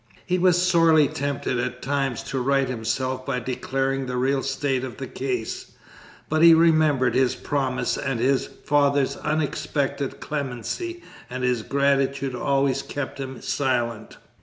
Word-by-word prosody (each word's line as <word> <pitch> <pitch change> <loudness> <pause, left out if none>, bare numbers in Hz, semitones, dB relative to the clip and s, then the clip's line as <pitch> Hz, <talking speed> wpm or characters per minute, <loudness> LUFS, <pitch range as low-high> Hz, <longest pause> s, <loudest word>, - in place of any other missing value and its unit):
He 180 0 0
was 180 0 +4
sorely 165 -4 +5
tempted 140 -3 -2
at 125 0 -3
times 135 -2 -1
to 135 -1 -3
right 135 +1 +2
himself 130 +2 -2
by 130 -1 -2
declaring 135 +2 -2
the 125 0 -3
real 135 +2 +1
state 135 -1 -1
of 130 -2 -6
the 135 - -5
case; 125 -3 -4 0.5
but 155 0 +1
he 165 -1 +9
remembered 155 -5 +3
his 130 -1 +2
promise 135 -3 -1
and 135 -4 -2
his 130 +2 +2
father's 140 -1 +1
unexpected 145 -2 -2
clemency 150 - -4 0.3
and 125 0 -5
his 125 -2 +1
gratitude 140 +1 +1
always 135 +1 +1
kept 145 -1 -5
him 130 -2 -6
silent. 120 -5 -1
135 Hz, 140 wpm, -24 LUFS, 130-145 Hz, 0.5 s, he